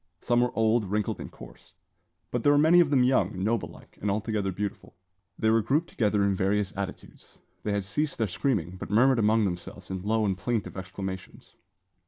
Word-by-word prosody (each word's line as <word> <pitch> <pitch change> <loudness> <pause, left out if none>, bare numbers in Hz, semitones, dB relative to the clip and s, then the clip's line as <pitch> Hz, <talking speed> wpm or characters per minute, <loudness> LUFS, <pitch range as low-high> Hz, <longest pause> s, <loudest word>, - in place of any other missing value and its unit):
Some 120 +5 +2
were 125 - +2
old, 110 0 +3
wrinkled, 105 +1 -1
and - - -7
coarse; - - -14 0.6
but 125 - -1
there 145 - +4
were 145 - +4
many 160 +4 +6
of 170 -4 +4
them 135 -3 +4
young, 95 -7 +1
noble 110 +1 0
like, - - -16
and 105 - -1
altogether 105 -1 -1
beautiful. 100 +2 -5 0.4
They 110 - +2
were 115 0 +4
grouped 145 +10 0
together 105 -3 +1
in 100 0 +2
various 95 +1 0
attitudes. 95 -1 -7 0.2
They 105 - -2
had 100 -1 -1
ceased 145 +10 -2
their 115 - +1
screaming, 95 - -1
but - - -7
murmured 125 +4 +4
among 110 0 +3
themselves 90 +1 -6
in 95 -1 -3
low 110 +2 +1
and 95 -2 +1
plaintive 115 +2 -2
exclamations. 95 0 -7
105 Hz, 195 wpm, -27 LUFS, 95-120 Hz, 0.6 s, many